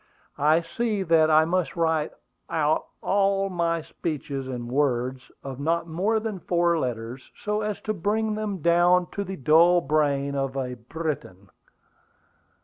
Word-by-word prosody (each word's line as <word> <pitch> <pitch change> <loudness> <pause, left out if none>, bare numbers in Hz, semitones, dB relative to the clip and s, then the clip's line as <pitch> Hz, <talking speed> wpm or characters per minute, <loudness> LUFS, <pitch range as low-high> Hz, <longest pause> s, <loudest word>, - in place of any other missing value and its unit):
'" - - -45
"I 155 +3 +4
see 210 +4 -2
that 160 -2 +4
I 155 0 +5
must 180 +1 -1
write 160 -2 +1 0.4
out 155 -1 +1 0.2
all 195 0 +2
my 170 -2 0
speeches 140 -5 -4
in 120 -2 -5
words 130 -1 -1
of 135 -1 -7
not 165 +4 0
more 195 +7 0
than 215 -3 -4
four 170 0 +1
letters, 120 -1 -4
so 210 0 -2
as 210 -2 -3
to 215 - -2
bring 215 +3 0
them 210 -6 -4
down 175 +1 +4
to 200 - -3
the 190 0 -6
dull 165 +5 +5
brain 140 -2 +1
of 135 -1 -2
a 125 -2 -2
Briton." 120 - -6
165 Hz, 150 wpm, -25 LUFS, 140-185 Hz, 0.4 s, I